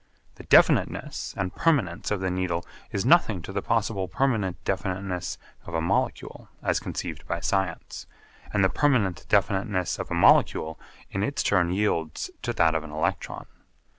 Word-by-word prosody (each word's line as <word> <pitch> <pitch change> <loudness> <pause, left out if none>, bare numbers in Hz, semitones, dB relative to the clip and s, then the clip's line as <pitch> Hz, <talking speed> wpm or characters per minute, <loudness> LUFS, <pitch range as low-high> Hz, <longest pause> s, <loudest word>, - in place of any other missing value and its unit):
The - - -13
definiteness - - +3
and 95 -1 -2
permanence 115 - +1
of 105 -2 -1
the 95 -1 0
Needle 90 -2 -2 0.3
is 100 - -2
nothing 115 - +4
to 95 - -7
the 100 0 -2
possible 110 -4 0
permanent 105 -5 0
definiteness 95 -1 -2 0.3
of 85 - -5
a - - +2
molecule 80 - -2
as - - +1
conceived - - -6
by - - -2
science, 95 -4 -2 0.4
and 100 -2 +2
the 95 - +4
permanent 110 - +1
definiteness 95 -2 +1
of - - -4
a - - -1
molecule 80 +1 +4 0.3
in 95 - -2
its 140 +7 -1
turn 90 -4 +2
yields 90 -5 -1
to - - -2
that 80 -1 +3
of 80 -1 -1
an 80 - -9
electron. 75 +1 -3
95 Hz, 160 wpm, -26 LUFS, 85-105 Hz, 0.4 s, nothing